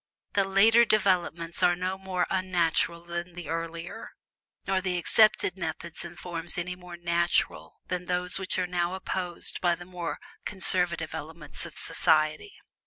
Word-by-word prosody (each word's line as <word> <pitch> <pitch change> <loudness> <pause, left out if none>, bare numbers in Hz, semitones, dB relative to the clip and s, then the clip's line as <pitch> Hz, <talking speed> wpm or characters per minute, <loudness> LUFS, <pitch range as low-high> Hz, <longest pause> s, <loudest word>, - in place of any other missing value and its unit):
The 200 - +3
later 220 +5 +6
developments 180 -6 +1
are 175 - +5
no 185 +2 -2
more 190 -2 -1
"unnatural" 175 -2 +1
than 175 +1 -5
the 175 -3 -8
earlier 165 +1 -5 0.5
nor 190 -1 +1
the 180 -1 -1
accepted 190 0 +4
methods 165 0 -5
and 175 0 -9
forms 170 -1 -2
any 180 +1 -3
more 180 -1 -10
"natural" 170 0 0
than 180 -1 -4
those 180 +1 +1
which 190 -1 -2
are 185 - +1
now 175 0 -1
opposed 185 -2 -4
by 175 -1 +3
the 175 +1 -11
more 175 -4 -4 0.3
conservative 180 -5 0
elements 160 -1 -7
of - - -12
society. 155 - +2
175 Hz, 150 wpm, -28 LUFS, 170-185 Hz, 0.5 s, later